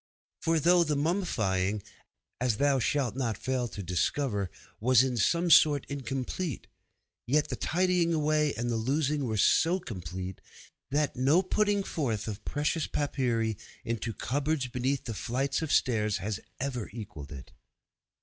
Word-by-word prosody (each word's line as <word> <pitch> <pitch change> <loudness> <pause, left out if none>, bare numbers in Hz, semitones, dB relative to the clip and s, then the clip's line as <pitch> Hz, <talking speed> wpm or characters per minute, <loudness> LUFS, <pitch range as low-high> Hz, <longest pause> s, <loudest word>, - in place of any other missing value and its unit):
For 165 0 +2
though 175 +3 +5
the 150 -2 0
mummifying, 110 - 0 0.6
as 125 -3 +1
thou 140 0 +3
shalt 125 0 0
not 115 -6 -1
fail 130 -2 -1
to 100 -3 -7
discover, 100 - 0 0.3
was 125 +2 +5
in 130 -2 -1
some 170 +9 +2
sort 145 -4 +6
incomplete, 135 +3 -3 0.6
yet 150 +4 +2
the - - -2
tidying 180 -1 +1
away 155 -1 +2
and 120 0 -2
the 115 - 0
losing 140 +4 0
were 110 -3 -1
so 170 - +4
complete 95 - -6 0.5
that 145 +1 0
no 140 +8 +3
putting 205 +1 +1
forth 115 - -2
of 105 -3 -5
precious 150 +2 -1
papyri 120 -7 0 0.3
into 115 0 -2
cupboards 140 +5 -1
beneath 130 +2 -2
flights 135 +6 -1
of 160 -3 -2
stairs 110 -5 +2
has 105 +1 -3 0.2
ever 125 -4 -3
equalled 95 - -8
it. 70 -3 -9
130 Hz, 140 wpm, -29 LUFS, 110-150 Hz, 0.6 s, sort